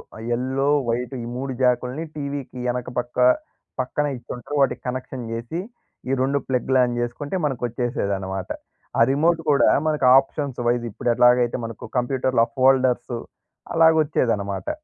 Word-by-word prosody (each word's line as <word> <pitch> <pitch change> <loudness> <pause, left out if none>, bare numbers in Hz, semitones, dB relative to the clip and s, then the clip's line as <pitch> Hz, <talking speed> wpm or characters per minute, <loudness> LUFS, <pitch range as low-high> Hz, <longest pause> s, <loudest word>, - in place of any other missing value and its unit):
ఆ - - -10
yellow, 130 +3 0 0.2
white 120 +2 -2
ఈ - - -5
3 130 +1 -3
జాకుల్ని 125 +4 +1
టీవీకి 140 -3 -5
ఎనక 125 0 -4
పక్క 120 0 -6 0.6
పక్కనిచ్చింటారు. 130 0 -3
వాటికి 135 - +1
కనెక్షన్ 125 -1 -5
జేసి 115 +9 -4 0.5
ఈ - - 0
2 140 +2 +1
ప్లగ్‌లాన్ 125 -1 +2
జేసుకుంటే 120 +7 -3
మనకొచ్చేసేదన్నమాట. 115 -7 -2 0.5
ఆ - - +5
రిమోట్ 165 +4 +2
గూడా 140 - +5 0.2
మనకు 150 -4 +1
ఆప్షన్స్ 135 -1 -4
వైస్ 120 0 +1
ఇప్పుడేట్లాగైతే 125 +2 +3
మనకు 115 -1 -8
కంప్యూటర్‌లో 125 -1 +2
ఆ - - -26
ఫోల్డర్స్ 130 -2 +3 0.6
అలాగొచ్చేదన్నమాట. 150 - +2
125 Hz, 120 wpm, -23 LUFS, 120-140 Hz, 0.6 s, ఆ